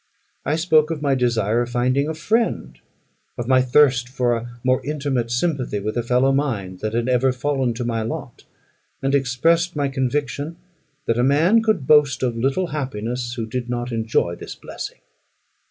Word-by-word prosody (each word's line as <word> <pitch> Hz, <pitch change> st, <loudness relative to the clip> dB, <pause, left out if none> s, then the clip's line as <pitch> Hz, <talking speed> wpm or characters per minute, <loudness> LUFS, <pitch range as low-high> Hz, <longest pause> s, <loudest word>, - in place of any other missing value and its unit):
I 145 Hz, -, +2 dB
spoke 160 Hz, -2 st, +3 dB
of 155 Hz, -3 st, -4 dB
my 140 Hz, -1 st, +2 dB
desire 120 Hz, -3 st, +1 dB
of 120 Hz, -, -3 dB
finding 130 Hz, +4 st, +1 dB
a 160 Hz, -, -3 dB
friend 220 Hz, +9 st, -1 dB, 0.6 s
of 120 Hz, -, -4 dB
my 130 Hz, 0 st, +5 dB
thirst 125 Hz, -1 st, +3 dB
for 125 Hz, -2 st, +1 dB
a 120 Hz, +1 st, -7 dB
more 130 Hz, 0 st, +2 dB
intimate 140 Hz, -5 st, -2 dB
sympathy 125 Hz, -4 st, -1 dB
with 110 Hz, +2 st, -3 dB
a 120 Hz, -, +1 dB
fellow 125 Hz, +3 st, +2 dB
mind 110 Hz, -10 st, -2 dB
than 110 Hz, +2 st, -3 dB
had 120 Hz, +1 st, 0 dB
ever 130 Hz, +1 st, +3 dB
fallen 130 Hz, -2 st, -1 dB
to 120 Hz, -, -3 dB
my 115 Hz, -1 st, -1 dB
lot; 110 Hz, -, -6 dB, 0.6 s
and 135 Hz, +1 st, +1 dB
expressed 160 Hz, +6 st, +2 dB
my 145 Hz, -1 st, 0 dB
conviction 140 Hz, +3 st, -2 dB, 0.5 s
that 115 Hz, +1 st, 0 dB
a -, -, +3 dB
man 160 Hz, -, +4 dB
could 215 Hz, -11 st, 0 dB
boast 145 Hz, -3 st, +4 dB
of 120 Hz, -2 st, 0 dB
little 135 Hz, +10 st, 0 dB
happiness, 120 Hz, -3 st, -3 dB
who 115 Hz, -3 st, -3 dB
did 120 Hz, +2 st, -4 dB
not 120 Hz, 0 st, -3 dB
enjoy 110 Hz, -6 st, 0 dB
this -, -, -8 dB
blessing. -, -, -8 dB
130 Hz, 175 wpm, -22 LUFS, 120-145 Hz, 0.6 s, my